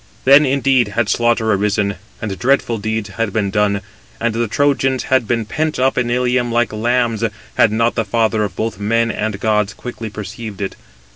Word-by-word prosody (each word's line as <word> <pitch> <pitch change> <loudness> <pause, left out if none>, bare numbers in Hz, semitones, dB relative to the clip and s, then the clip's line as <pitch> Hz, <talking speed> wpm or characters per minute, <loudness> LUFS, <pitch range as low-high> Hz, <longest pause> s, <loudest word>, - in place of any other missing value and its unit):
Then, 140 +2 +7
indeed, 135 -2 +2
had 115 -3 +1
slaughter 115 0 +2
arisen, 100 0 +1 0.3
and 100 -3 -4
dreadful 120 -3 +1
deeds 110 0 -2
had 105 +3 -2
been 100 -1 -1
done, 105 -1 +1 0.4
and 120 -1 0
[the 115 +1 0
Trojans] 135 +1 +1
had 130 -4 +1
been 115 -1 0
pent 155 +7 -2
up 130 +1 +2
in 125 -1 0
Ilium 125 0 +1
like 120 -1 +1
lambs, 115 0 0 0.3
had 110 - +4
not 115 +2 +1
the 115 - 0
father 110 0 +1
of 100 - -4
both 110 -3 -3
men 115 +2 +1
and 110 -2 -3
gods 105 -1 0
quickly 115 -2 -7
perceived 105 +1 -7
it. 95 -1 -4
115 Hz, 185 wpm, -18 LUFS, 105-125 Hz, 0.4 s, Then